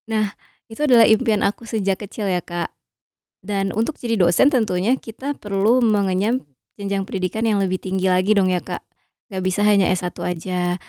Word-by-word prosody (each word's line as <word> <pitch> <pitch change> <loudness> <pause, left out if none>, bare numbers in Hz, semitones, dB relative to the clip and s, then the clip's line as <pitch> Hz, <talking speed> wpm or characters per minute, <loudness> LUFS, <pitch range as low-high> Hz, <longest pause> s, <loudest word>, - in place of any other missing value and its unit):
Nah 215 -2 0 0.4
itu 225 - -8
adalah 240 -4 +7
impian 220 -2 +3
aku 210 +3 -2
sejak 200 -4 -1
kecil 210 +1 -5
ya 180 -1 0
Kak, 175 0 -4 0.7
dan 195 0 -2
untuk 230 +8 -1
jadi 230 -3 -2
dosen 175 - +4
tentunya 220 -2 +1
kita 260 +6 -5
perlu 205 +4 +2
mengenyam 210 +1 +1 0.3
jenjang 200 -1 -2
pendidikan 190 +3 -3
yang 210 -2 +2
lebih 185 -1 0
tinggi 190 0 -2
lagi 185 +3 +3
dong 185 -2 +3
ya 180 - +1
Kak. - - -7 0.5
Gak 190 -1 -3
bisa 185 +2 0
hanya 205 -2 +4
S1 180 -1 -1
aja. 180 0 -2
200 Hz, 170 wpm, -21 LUFS, 185-220 Hz, 0.7 s, adalah